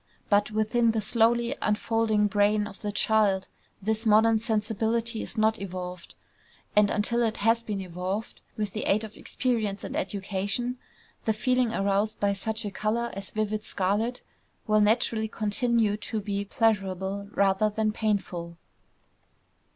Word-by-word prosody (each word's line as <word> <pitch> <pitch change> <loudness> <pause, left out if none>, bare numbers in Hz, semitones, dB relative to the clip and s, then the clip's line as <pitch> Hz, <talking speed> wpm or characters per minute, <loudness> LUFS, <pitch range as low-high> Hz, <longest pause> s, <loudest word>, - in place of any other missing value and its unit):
But 205 +1 +4
within 220 +2 +2
the 225 - +1
slowly 235 +4 +2
unfolding 215 0 +1
brain 205 +1 +2
of 200 -2 -10
the 210 - -2
child, 205 -2 +2 0.4
this 220 +2 0
modern 220 0 +5
sensibility 225 +1 -1
is - - -6
not 220 0 +2
evolved; 180 -2 -6 0.6
and 210 -1 +5
until 235 +3 +2
it 225 -2 0
has 225 +2 +3
been 210 -3 -4
evolved, 185 +4 -4 0.2
with 210 -3 -2
the 215 - -3
aid 210 +2 +2
of 215 -1 -8
experience 220 -6 -2
and - - -5
of - - +1
education, 200 +6 -2 0.5
the 220 - +2
feeling 250 +2 +1
aroused 200 +1 0
by 200 -1 +2
such 220 +3 -2
a 205 - -3
color 225 +4 -1
as 195 0 -5
vivid 215 0 -2
scarlet 210 +7 -1 0.4
will 215 0 +3
naturally 220 +1 +2
continue 220 0 +1
to 215 +1 -4
be 200 -1 -3
pleasurable 200 -2 0
rather 200 +2 +3
than 215 0 0
painful. 190 -6 -2
215 Hz, 145 wpm, -27 LUFS, 200-225 Hz, 0.6 s, modern